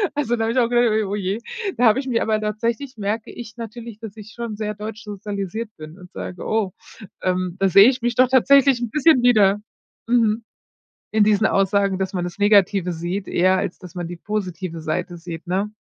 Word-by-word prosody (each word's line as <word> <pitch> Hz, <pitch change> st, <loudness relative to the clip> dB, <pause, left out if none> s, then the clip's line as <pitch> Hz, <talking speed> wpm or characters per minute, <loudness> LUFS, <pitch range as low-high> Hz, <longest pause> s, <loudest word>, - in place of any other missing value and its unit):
Also, 260 Hz, -5 st, 0 dB
da 225 Hz, -, 0 dB
habe 225 Hz, -, 0 dB
ich -, -, -3 dB
auch 235 Hz, -, +2 dB
gedacht: 235 Hz, -3 st, +2 dB
„Oh 200 Hz, -, -2 dB
je.“ 200 Hz, +1 st, -2 dB, 0.4 s
Da 245 Hz, -, +3 dB
habe 225 Hz, +4 st, +5 dB
ich 270 Hz, -, -5 dB
mir 235 Hz, -3 st, 0 dB
aber 215 Hz, -1 st, +1 dB
tatsächlich 230 Hz, +5 st, -2 dB
merke 210 Hz, +2 st, -3 dB
ich 230 Hz, -1 st, -10 dB
natürlich, 230 Hz, -1 st, -8 dB
dass 225 Hz, -3 st, -9 dB
ich 215 Hz, 0 st, -11 dB
schon 235 Hz, -2 st, -5 dB
sehr 210 Hz, 0 st, -3 dB
deutsch 215 Hz, +1 st, -7 dB
sozialisiert 205 Hz, +1 st, -5 dB
bin 155 Hz, +4 st, -11 dB
und 180 Hz, -1 st, -13 dB
sage: 180 Hz, -, -7 dB
„Oh, 215 Hz, -3 st, 0 dB, 0.5 s
ähm, 185 Hz, -1 st, -1 dB
da 195 Hz, -, +3 dB
sehe 200 Hz, +5 st, +8 dB
ich 260 Hz, -1 st, -2 dB
mich 240 Hz, 0 st, -1 dB
doch 255 Hz, +1 st, +4 dB
tatsächlich 270 Hz, 0 st, +5 dB
'n 240 Hz, -, -2 dB
bisschen 300 Hz, +1 st, +4 dB
wieder. 210 Hz, -4 st, +4 dB, 0.5 s
Mhm. 230 Hz, -2 st, +2 dB, 0.7 s
In 215 Hz, -1 st, +4 dB
diesen 215 Hz, 0 st, +3 dB
Aussagen, 195 Hz, 0 st, +1 dB
dass 190 Hz, 0 st, -2 dB
man 180 Hz, -1 st, -1 dB
das 175 Hz, +2 st, -7 dB
Negative 200 Hz, -3 st, +3 dB
sieht, 175 Hz, +4 st, -4 dB
eher 185 Hz, +2 st, +3 dB
als -, -, -3 dB
dass 180 Hz, 0 st, -12 dB
man 175 Hz, -1 st, -3 dB
die 175 Hz, -, -7 dB
positive 185 Hz, -3 st, -4 dB
Seite 160 Hz, +3 st, -3 dB
sieht.“ 165 Hz, 0 st, -8 dB
Ne? 195 Hz, +3 st, -1 dB
210 Hz, 210 wpm, -21 LUFS, 190-230 Hz, 0.7 s, sehe